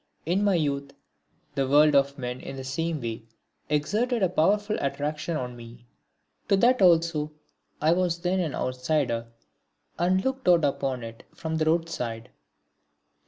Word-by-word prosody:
In 180 +5 +1
my 200 -2 +3
youth 140 -3 -1 0.6
the 135 -2 0
world 150 +2 +5
of 140 0 +3
men 125 -1 -4
in - - -7
the 135 - -6
same 160 +4 -2
way 115 -3 -4 0.5
exerted 210 - 0
a 185 - +3
powerful 205 +5 +2
attraction 150 +3 -2
on 125 -2 -5
me. 120 0 -12 0.6
To 195 - +4
that 245 +3 +4
also 165 -4 +3 0.5
I 155 +2 +3
was 175 -1 +1
then 180 +2 0
an 165 -5 -1
outsider 125 -2 -1 0.7
and 185 +2 +2
looked 265 -3 -2
out 170 -4 +5
upon 135 -3 -1
it 115 0 -9
from 160 -1 -3
the 155 - +1
roadside. 155 -8 -1
155 Hz, 150 wpm, -26 LUFS, 135-175 Hz, 0.7 s, world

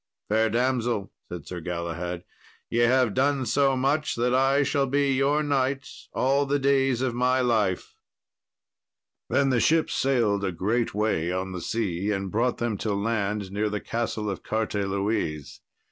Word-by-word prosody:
"Fair 110 +1 +3
damsel," 120 -3 0 0.2
said 85 -4 -7
Sir 90 - -6
Galahad, 85 +1 -4 0.5
"ye 115 - +1
have 120 -2 +3
done 135 0 +1
so 135 +3 +2
much 145 +4 0
that 125 +1 +1
I 135 +2 +3
shall 140 0 +1
be 140 +1 +1
your 140 +3 +2
knight 135 -1 0 0.2
all 140 +2 +1
the 145 +1 +2
days 135 -2 +2
of 130 -2 0
my 125 +2 +2
life." 110 -7 0 1.4
Then 140 -1 +2
the 125 - +2
ship 160 +6 +2
sailed 115 -7 +1
a 95 - 0
great 105 +7 -1
way 105 -6 0
on 95 +1 -3
the 90 -1 -5
sea, 100 -2 -2
and 95 -2 -2
brought 120 +3 +1
them 120 -3 -1
to 105 -1 -2
land 105 -2 -1
near 105 +2 -1
the 105 0 -2
Castle 115 -2 -3
of 100 - -3
Carteloise. 100 -7 -2
115 Hz, 160 wpm, -26 LUFS, 100-135 Hz, 1.4 s, Fair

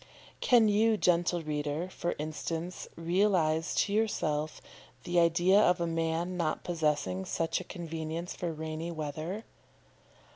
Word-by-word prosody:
Can 235 -3 +5
you, 215 +1 +3
gentle 175 -2 +2
reader, 150 +2 -2
for 175 -2 -3
instance, 160 +3 -4
realise 165 -2 +1
to 200 - +1
yourself 155 -8 0 0.4
the 175 0 +2
idea 175 +4 +5
of 180 -3 +4
a 170 - 0
man 165 +2 -1
not 160 -3 -1
possessing 150 - 0
such 165 - -1
a - - -10
convenience 165 -1 -5
for 175 -2 -3
rainy 160 +1 -4
weather? 160 +6 -4
170 Hz, 130 wpm, -30 LUFS, 155-180 Hz, 0.4 s, Can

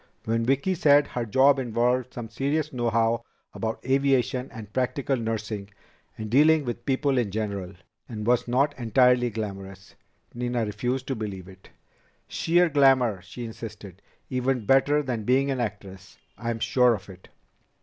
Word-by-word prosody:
When 115 +1 0
Vicki 140 +8 +1
said 145 -4 +4
her 120 -2 -3
job 135 +5 +4
involved 125 +1 0
some 120 -2 -5
serious 140 +7 -2
know 120 -2 0
how 115 +1 +1 0.3
about 110 +1 -4
aviation 135 -1 +1
and 105 -2 -10
practical 135 +2 0
nursing, 110 -3 -4 0.5
and 110 - -5
dealing 150 +5 +4
with 120 +3 -5
people 135 0 +1
in 115 -4 -1
general 100 -3 -4 0.4
and 105 -3 -5
was 120 +1 +2
not 135 +4 +2
entirely 125 +1 +3
glamorous 100 -3 -7 0.4
Nina 120 -1 -2
refused 125 +5 -2
to 135 - -1
believe 100 -5 -6
it. 95 -1 -16 0.6
"Sheer 175 +2 +2
glamour," 135 - +3
she 105 +7 -8
insisted. 105 -4 -9 0.3
"Even 130 -2 -1
better 145 +5 +3
than 120 -5 -3
being 135 +4 +2
an 130 - -2
actress. 95 -4 -6 0.2
I'm 115 -1 -3
sure 125 +1 +3
of 100 -1 -11
it." 95 -2 -14
120 Hz, 150 wpm, -26 LUFS, 110-135 Hz, 0.6 s, said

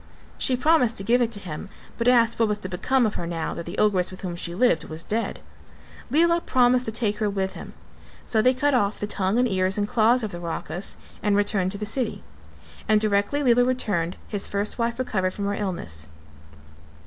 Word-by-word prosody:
She 255 - +2
promised 255 -5 +3
to 195 - -2
give 240 +4 +3
it 235 -1 +1
to 205 - -4
him 185 +1 -7 0.3
but 235 - 0
asked 235 -2 +4
what 225 - +4
was 210 -1 -1
to 205 - -6
become 240 +8 +1
of 215 - 0
her 170 - -4
now 165 -1 -3
that 170 - -7
the 175 - -6
ogress 190 -4 +2
with 185 - -10
whom 180 -3 -4
she 170 0 -4
lived 185 -7 +2
was 160 +1 -7
dead. 225 +5 -2 0.7
Lela 335 +5 +3
promised 250 -2 +3
to 220 - -1
take 210 -2 -1
her 215 -2 +1
with 190 -1 -2
him, - - -10 0.5
so 220 - +2
they 255 +3 +4
cut 290 +2 +1
off 205 -5 +1
the - - -2
tongue 200 0 0
and 250 0 +3
ears 190 -2 0
and 205 0 0
claws 235 +3 +3
of 215 - -3
the 175 - -6
Rakhas 175 +2 -4 0.2
and 205 -1 +2
returned 200 -2 +1
to - - -5
the 210 - -4
city. 240 +3 -2 0.7
And 215 -1 +5
directly 210 +7 +1
Lela 245 -1 +5
returned, 205 -9 0
his 205 -2 -3
first 200 +4 -2
wife 235 0 0
recovered 190 -7 -1
from 200 - -3
her 200 - 0
illness. 170 - -4
210 Hz, 215 wpm, -24 LUFS, 190-245 Hz, 0.7 s, And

